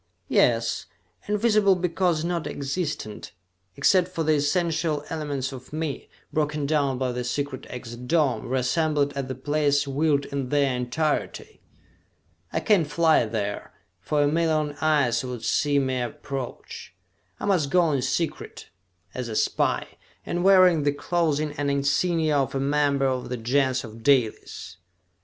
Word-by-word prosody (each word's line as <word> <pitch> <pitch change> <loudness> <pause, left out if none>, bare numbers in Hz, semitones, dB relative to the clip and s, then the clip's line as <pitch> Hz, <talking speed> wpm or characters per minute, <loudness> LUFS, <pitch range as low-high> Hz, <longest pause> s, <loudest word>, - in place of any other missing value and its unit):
"Yes, - - +2 0.4
invisible 210 -2 +3
because 175 -2 0
non 170 -2 -2
existent, 140 - -4 0.4
except 185 -2 +4
for 180 -3 -3
the 155 0 +3
essential 155 0 0
elements 145 -4 -3
of 130 -2 -10
me, 155 -2 -4 0.2
broken 150 -1 0
down 140 -3 +1
by 130 -1 -1
the 125 0 -3
secret 135 +1 -3
exit 125 0 -8
dome, 130 -7 +1
reassembled 145 +3 +1
at 140 -2 -4
the 130 - -4
place 145 +1 +1
willed 140 0 +1
in 140 -3 -4
their 140 -2 +2
entirety! 125 +5 -2 0.9
I - - -1
can't 195 -8 +3
fly 160 -4 +3
there, 105 -2 -4 0.3
for 150 -1 0
a - - +3
million 155 -1 +1
eyes 140 -7 +2
would 125 -3 -6
see 145 +4 +2
me 130 -2 0
approach! 125 +2 -6 0.4
I - - -4
must 180 -8 +2
go 175 0 +3
in 140 -3 0
secret, 140 +5 -3 0.4
as 125 -2 -4
a 110 - -4
spy, - - +1 0.4
and 175 0 -2
wearing 185 -4 +6
the 145 0 +1
clothing 155 -1 0
and 145 -1 0
insignia 145 +3 +1
of 135 0 -1
a - - 0
member 140 0 +1
of 130 -1 -1
the 125 - -3
Gens 130 +2 +1
of 115 -1 -10
Dalis!" 125 -4 0
145 Hz, 145 wpm, -25 LUFS, 130-160 Hz, 0.9 s, wearing